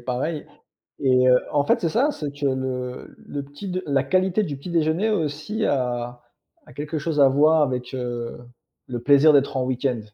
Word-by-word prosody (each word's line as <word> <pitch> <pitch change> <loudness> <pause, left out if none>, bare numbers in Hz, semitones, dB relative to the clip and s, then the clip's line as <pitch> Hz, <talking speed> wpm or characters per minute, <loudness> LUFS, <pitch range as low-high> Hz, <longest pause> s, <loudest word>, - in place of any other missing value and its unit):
pareils 130 +6 -3 0.5
et 130 -1 +4
heu 125 0 +6
en 145 -1 +2
fait, - - +2
c'est 165 - 0
ça, 270 - +2
c'est 150 - -5
que 145 0 -3
le 130 -1 -3
le 145 -1 -6
petit-d 180 +6 -6
la 140 -2 +2
qualité 185 +6 +1
du 145 -8 -4
petit-déjeuner 165 +6 0
au 205 -5 +1
aussi 155 +10 -3
a 120 -2 -2 0.5
a - - -15
quelque 150 +2 -4
chose 150 -1 -1
à 135 - +7
voir 155 +3 +4
avec, 125 -2 -2
heu, 120 -2 -4 0.5
le 120 -2 -5
plaisir 145 +3 +6
d'être 140 -1 +2
en 130 - 0
week-end. 125 -1 -1
140 Hz, 185 wpm, -23 LUFS, 125-155 Hz, 0.5 s, à